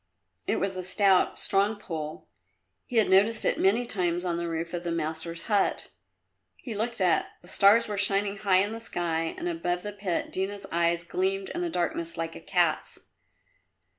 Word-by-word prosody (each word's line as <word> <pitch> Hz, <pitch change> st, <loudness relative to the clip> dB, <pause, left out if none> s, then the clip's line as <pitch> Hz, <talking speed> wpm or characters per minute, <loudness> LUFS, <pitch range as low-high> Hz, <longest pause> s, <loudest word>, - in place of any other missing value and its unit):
It -, -, +1 dB
was 195 Hz, -1 st, -2 dB
a 185 Hz, -, -4 dB
stout, 190 Hz, 0 st, +3 dB
strong 200 Hz, +2 st, +1 dB
pole; 160 Hz, -6 st, -6 dB, 0.6 s
he 250 Hz, -, -7 dB
had 220 Hz, -2 st, +6 dB
noticed 205 Hz, +4 st, +4 dB
it -, -, +1 dB
many 215 Hz, +6 st, +3 dB
times 180 Hz, -5 st, -1 dB
on 170 Hz, -1 st, -1 dB
the 170 Hz, 0 st, -3 dB
roof 165 Hz, +1 st, -4 dB
of 175 Hz, 0 st, -3 dB
the 175 Hz, -, -3 dB
master's 165 Hz, +1 st, -3 dB
hut. 205 Hz, -3 st, 0 dB, 0.7 s
He 245 Hz, -, -7 dB
looked 225 Hz, +3 st, -2 dB
up. 180 Hz, -2 st, +2 dB, 0.2 s
The -, -, -15 dB
stars 200 Hz, +5 st, +5 dB
were 205 Hz, -2 st, -3 dB
shining 200 Hz, 0 st, +1 dB
high 195 Hz, -2 st, +3 dB
in 205 Hz, -, -2 dB
the 225 Hz, -, -5 dB
sky 165 Hz, -6 st, -2 dB
and -, -, -4 dB
above 175 Hz, +1 st, -2 dB
the 210 Hz, -, -4 dB
pit 195 Hz, -4 st, -3 dB
Dina's 195 Hz, +2 st, -3 dB
eyes 170 Hz, 0 st, +1 dB
gleamed 190 Hz, +2 st, -1 dB
in 345 Hz, -, -4 dB
the 350 Hz, -, -1 dB
darkness 170 Hz, -, -2 dB
like 165 Hz, 0 st, -4 dB
a -, -, -9 dB
cat's. -, -, 0 dB
185 Hz, 185 wpm, -27 LUFS, 170-205 Hz, 0.7 s, had